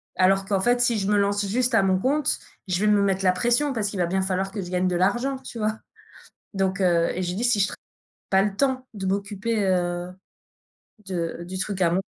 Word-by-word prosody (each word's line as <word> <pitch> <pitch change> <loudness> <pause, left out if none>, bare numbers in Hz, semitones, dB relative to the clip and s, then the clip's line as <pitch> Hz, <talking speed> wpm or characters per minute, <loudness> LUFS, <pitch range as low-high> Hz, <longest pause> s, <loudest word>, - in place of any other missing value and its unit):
Alors 195 +1 +3
qu'en 195 0 0
fait 245 +4 +2
si 235 -3 +2
je 195 - -2
me 205 - +4
lance 205 0 +1
juste 245 +4 0
à 220 - +5
mon 190 -1 +3
compte, 285 +6 +1 0.3
je 180 -1 0
vais 210 - +2
me 205 -1 +4
mettre 195 -1 +1
la 185 - +6
pression 240 +9 +1
parce 210 -4 -1
qu'il 200 - -6
va 175 - +3
bien 190 +2 0
falloir 190 0 -1
que 205 0 -4
je 180 - -7
gagne 180 0 +1
de 180 - 0
l'argent, 240 +9 +1
tu 250 -3 -9
vois? 215 0 -1 0.8
Donc 195 0 0
heu, 170 -2 +3
et 185 - -2
je 175 - -2
lui 180 - -4
dis: 235 - -2
«Si 240 -4 +2
je 195 - +4
tra - - -7 0.5
pas 190 0 +4
le 205 -1 -1
temps 260 0 0
de 190 -2 -4
m'occuper, 200 +3 -1
heu, 175 -1 -1 0.9
de 170 -2 -3
du 185 +2 -6
truc 195 -1 -3
à 170 - +4
mon». 185 +3 +1
195 Hz, 240 wpm, -24 LUFS, 185-220 Hz, 0.9 s, la